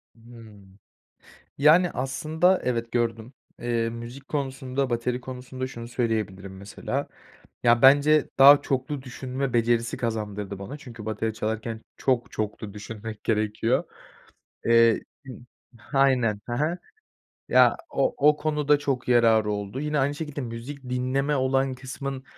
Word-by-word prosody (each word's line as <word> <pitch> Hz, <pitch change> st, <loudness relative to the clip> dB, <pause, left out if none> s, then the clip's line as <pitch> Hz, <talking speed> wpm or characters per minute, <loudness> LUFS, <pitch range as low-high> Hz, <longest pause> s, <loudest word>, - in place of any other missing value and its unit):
Hımm. 110 Hz, -4 st, -15 dB, 0.8 s
Yani, 165 Hz, +5 st, +5 dB
aslında, 155 Hz, +7 st, +1 dB
evet, 115 Hz, -2 st, -2 dB
gördüm. 115 Hz, +1 st, -1 dB, 0.3 s
Eee, 115 Hz, -1 st, 0 dB
müzik 120 Hz, +4 st, -9 dB
konusunda, 135 Hz, -2 st, -2 dB
bateri 125 Hz, +1 st, -1 dB
konusunda 130 Hz, 0 st, -6 dB
şunu 120 Hz, -2 st, -8 dB
söyleyebilirim 105 Hz, -6 st, -2 dB
mesela: 100 Hz, +1 st, -4 dB, 0.6 s
Ya, 120 Hz, 0 st, +4 dB
bence 145 Hz, +2 st, +6 dB
daha 140 Hz, +1 st, +9 dB
çoklu 135 Hz, +1 st, -2 dB
düşünme 130 Hz, 0 st, -4 dB
becerisi 115 Hz, -1 st, +1 dB
kazandırdı 105 Hz, -4 st, -4 dB
bana. 100 Hz, +9 st, -7 dB
Çünkü 120 Hz, -6 st, -11 dB
bateri 110 Hz, 0 st, -2 dB
çalarken 110 Hz, +1 st, -3 dB, 0.2 s
çok 125 Hz, -3 st, 0 dB
çoklu 105 Hz, -1 st, -4 dB
düşünmek 110 Hz, +1 st, -8 dB
gerekiyor. 110 Hz, +2 st, +1 dB, 0.8 s
Eee 115 Hz, -1 st, +5 dB, 0.3 s
ııı, 130 Hz, -, -8 dB, 0.4 s
aynen, 130 Hz, -5 st, +1 dB
he 120 Hz, -, -5 dB
he. 155 Hz, +6 st, 0 dB, 0.7 s
Ya, -, -, +5 dB
o 290 Hz, -, 0 dB
o 150 Hz, -, +2 dB
konuda 150 Hz, -1 st, +1 dB
çok 135 Hz, -4 st, -2 dB
yararı 115 Hz, -3 st, +4 dB
oldu. 105 Hz, +5 st, -4 dB
Yine 150 Hz, 0 st, -1 dB
aynı 140 Hz, +2 st, +1 dB
şekilde, 150 Hz, -2 st, -5 dB
müzik 125 Hz, +4 st, -7 dB
dinleme 130 Hz, +3 st, 0 dB
olan 135 Hz, 0 st, +1 dB
kısmın 135 Hz, +1 st, -6 dB
125 Hz, 125 wpm, -25 LUFS, 115-135 Hz, 0.8 s, daha